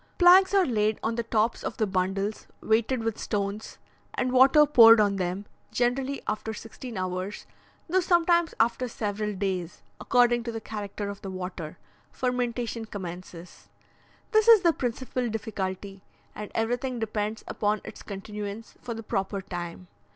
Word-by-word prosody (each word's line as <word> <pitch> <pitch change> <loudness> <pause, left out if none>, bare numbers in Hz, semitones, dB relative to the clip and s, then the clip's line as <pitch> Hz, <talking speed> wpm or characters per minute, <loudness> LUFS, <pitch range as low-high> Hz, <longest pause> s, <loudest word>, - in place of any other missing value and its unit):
Planks 370 +2 +7
are 385 -2 +5
laid 215 -4 +1
on 225 - 0
the 235 - -1
tops 225 0 0
of - - -4
the 220 - +2
bundles 195 +2 -2
weighted 225 +2 +1
with 225 -1 -2
stones, 200 +1 -3 0.4
and 250 - 0
water 265 +4 +6
poured 230 -6 +8
on 205 -2 +2
them; 185 +2 -2 0.3
generally 260 +3 -1
after 215 +1 -3
sixteen 225 +1 -8
hours, 185 +2 -4 0.4
though 365 +3 +2
sometimes 345 -1 +3
after 235 +2 +2
several 210 -2 -3
days, 185 -3 -3 0.2
according 240 -1 +3
to 235 0 -4
the 225 - -4
character 210 -2 -5
of 200 0 -8
the 195 - -6
water, 180 -4 -6 0.3
fermentation 245 -2 -2
commences. 180 -3 -9 0.6
This 435 0 +4
is 455 -4 +9
the 340 -3 +4
principal 250 -1 -2
difficulty, 195 -3 -4 0.3
and 210 -1 -7
everything 245 +3 -1
depends 215 -1 -3
upon 210 0 0
its - - -10
continuance 210 +2 -7
for 235 -2 -5
the 225 - -7
proper 195 -1 -2
time. 175 -1 -6
220 Hz, 150 wpm, -27 LUFS, 200-245 Hz, 0.6 s, is